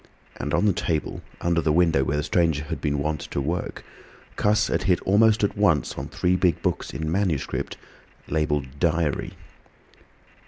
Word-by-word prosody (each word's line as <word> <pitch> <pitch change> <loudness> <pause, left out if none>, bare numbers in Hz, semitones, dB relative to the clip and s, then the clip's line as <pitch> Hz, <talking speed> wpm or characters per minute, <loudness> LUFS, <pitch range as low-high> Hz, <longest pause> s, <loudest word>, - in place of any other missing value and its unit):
And - - -4
on - - +2
the 100 - +4
table 85 -2 -2 0.2
under 85 -1 +1
the 80 - +1
window 80 -4 +3
where 75 +2 -1
the 75 - 0
stranger 80 -3 +1
had 75 - -5
been 75 0 0
wont 75 +1 -2
to - - -2
work, 80 +6 -3 0.5
Cuss 105 +1 +2
had - - -1
hit 90 -3 +3
almost 105 +2 +4
at 100 - +1
once 85 -10 +2
on - - -6
three 90 +1 0
big 90 -2 +2
books - - -1
in 80 0 -3
manuscript 90 -6 -1 0.5
labelled 75 -3 -1
"Diary." 80 -2 0
80 Hz, 165 wpm, -24 LUFS, 75-90 Hz, 0.5 s, the